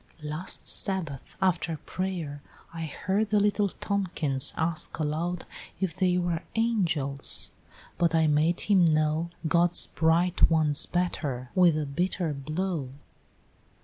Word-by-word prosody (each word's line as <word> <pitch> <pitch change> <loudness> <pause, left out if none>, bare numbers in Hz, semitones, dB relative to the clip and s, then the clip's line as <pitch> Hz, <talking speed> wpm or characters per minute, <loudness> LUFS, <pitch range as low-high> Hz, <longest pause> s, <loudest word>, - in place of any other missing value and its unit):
last 155 +5 -4
Sabbath 170 -9 0
after 170 -3 0
pray'r, 170 -6 -4 0.3
I 165 -1 -4
heard 195 +7 -2
the 210 0 +3
little 205 0 +1
Tomkins 170 -10 -1
ask 165 +1 -2
aloud 165 +3 -2 0.3
If 185 -5 -2
they 180 -1 +1
were 175 -2 -1
angels 170 -12 +2 0.5
but 170 -2 +2
I 160 -1 +3
made 155 +3 +2
him 195 -4 +3
know 155 +1 +1 0.2
God's 170 +1 +4
bright 165 +2 +2
ones 155 -3 +3
better, 145 -8 -2
with 175 -4 +4
a 155 - -1
bitter 170 +2 -2
blow!" 155 +1 -3
165 Hz, 120 wpm, -27 LUFS, 155-185 Hz, 0.5 s, God's